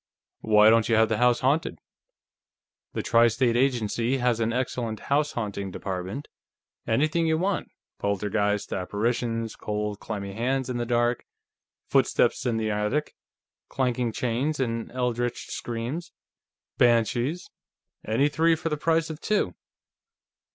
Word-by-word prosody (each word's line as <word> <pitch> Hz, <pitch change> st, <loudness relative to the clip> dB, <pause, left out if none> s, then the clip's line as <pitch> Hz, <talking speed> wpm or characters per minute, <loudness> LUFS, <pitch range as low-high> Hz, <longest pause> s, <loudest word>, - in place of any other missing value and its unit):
"Why 105 Hz, 0 st, +6 dB
don't 115 Hz, 0 st, +3 dB
you 115 Hz, -, +4 dB
have 110 Hz, 0 st, +4 dB
the 110 Hz, -1 st, 0 dB
house 125 Hz, -1 st, +3 dB
haunted? 140 Hz, +5 st, +1 dB, 1.2 s
The -, -, -2 dB
Tri 115 Hz, 0 st, +5 dB
State 120 Hz, +1 st, +1 dB
Agency 120 Hz, -1 st, +1 dB
has 120 Hz, -2 st, +1 dB
an 115 Hz, 0 st, +1 dB
excellent 120 Hz, -3 st, -2 dB
house 150 Hz, +1 st, +2 dB
haunting 100 Hz, -4 st, -3 dB
department. 95 Hz, +8 st, -5 dB, 0.6 s
Anything 155 Hz, +8 st, +2 dB
you 160 Hz, 0 st, +2 dB
want; 190 Hz, +2 st, -1 dB, 0.3 s
poltergeists; 100 Hz, 0 st, 0 dB
apparitions; 115 Hz, +4 st, -1 dB
cold, 105 Hz, -1 st, -3 dB
clammy 100 Hz, -3 st, -5 dB
hands 130 Hz, +4 st, -1 dB
in 125 Hz, -, -2 dB
the 120 Hz, -1 st, -2 dB
dark; 120 Hz, 0 st, +1 dB, 0.6 s
footsteps 130 Hz, -, +2 dB
in 115 Hz, -2 st, +1 dB
the 110 Hz, -1 st, -1 dB
attic; 105 Hz, +9 st, -1 dB, 0.6 s
clanking 125 Hz, -3 st, 0 dB
chains 125 Hz, +7 st, -1 dB
and 115 Hz, -3 st, -2 dB
eldritch 120 Hz, -1 st, -2 dB
screams; 120 Hz, +9 st, -4 dB, 0.7 s
banshees. 120 Hz, +7 st, +2 dB, 0.5 s
Any 115 Hz, +7 st, +2 dB
three 160 Hz, +3 st, +3 dB
for 165 Hz, +1 st, -3 dB
the 150 Hz, -, -1 dB
price 165 Hz, +1 st, +1 dB
of 155 Hz, -, -9 dB
two." 200 Hz, -, 0 dB
120 Hz, 130 wpm, -26 LUFS, 110-135 Hz, 1.2 s, Why